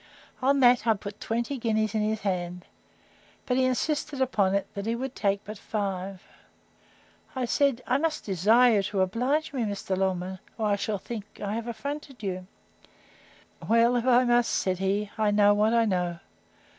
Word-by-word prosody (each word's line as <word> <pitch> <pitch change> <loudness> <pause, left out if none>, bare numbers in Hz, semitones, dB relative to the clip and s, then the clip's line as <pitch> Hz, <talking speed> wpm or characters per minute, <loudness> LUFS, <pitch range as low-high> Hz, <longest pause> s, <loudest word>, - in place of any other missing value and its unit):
On 275 +1 +3
that 245 -2 +5
I 225 - +5
put 200 +1 -8
twenty 235 +4 -2
guineas 220 -2 0
in 215 - +1
his 215 +1 -1
hand; 180 -2 -3 0.8
but 250 - 0
he 260 0 +3
insisted 285 +2 -1
upon 205 -7 +2
it, 200 - 0
that 200 +1 -5
he 230 - 0
would 260 +2 -4
take 200 -3 -1
but 215 0 -8
five. 195 -3 -4 1.1
I 255 -1 -1
said, 265 -1 +1
I 255 +2 +1
must 315 0 -1
desire 220 +5 +4
you - - +3
to 195 0 -1
oblige 250 +12 0
me, 260 - -2
Mr. 200 -3 -2
Longman, 185 0 -2 0.2
or 220 - -1
I 205 - +3
shall 205 +1 -2
think 210 +1 -8
I 205 0 -3
have 230 +1 -4
affronted 280 +1 -6
you. 185 -2 -4 1.2
Well, 230 +2 +4
if 240 +1 0
I 250 0 +5
must, 240 -1 +3
said 185 -1 0
he, 200 +2 -1
I 215 -1 +3
know 205 0 +5
what 210 +2 +2
I 230 -1 +4
know. 180 -4 -1
215 Hz, 180 wpm, -27 LUFS, 195-245 Hz, 1.2 s, that